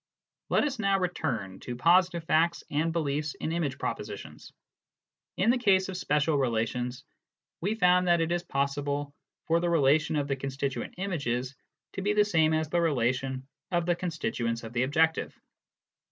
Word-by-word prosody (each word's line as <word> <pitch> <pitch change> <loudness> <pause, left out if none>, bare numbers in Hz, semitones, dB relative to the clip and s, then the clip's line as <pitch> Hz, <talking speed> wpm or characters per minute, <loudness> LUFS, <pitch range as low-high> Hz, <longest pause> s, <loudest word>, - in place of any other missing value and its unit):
Let - - +3
us 275 -4 -2
now 195 -2 +2
return 130 - -2
to 125 - -6
positive 170 +4 +3
facts 165 +1 +2
and 155 +3 +1
beliefs 150 -2 -1
in 155 - -4
image 160 -6 -1
propositions. - - -6 0.9
In 195 +6 +4
the 250 - +1
case 190 -5 +3
of 190 - -5
spatial 150 -3 +1
relations, 125 +1 -1 0.6
we 200 +6 0
found 180 -3 +4
that 175 -1 +4
it 165 0 0
is 175 0 +1
possible 140 -1 -2 0.3
for 165 0 +2
the 175 0 0
relation 155 0 +3
of 145 -1 0
the 140 - 0
constituent 135 0 -4
images 140 -9 -2 0.4
to - - -4
be 205 +2 +1
the 210 0 +4
same 160 -6 +3
as 155 0 0
the 170 +2 +1
relation 130 -3 0 0.2
of 175 -2 0
the 175 0 +2
constituents 120 -10 -2
of 115 +1 -8
the 120 - +1
objective. 160 +5 +1
155 Hz, 165 wpm, -28 LUFS, 135-175 Hz, 0.9 s, In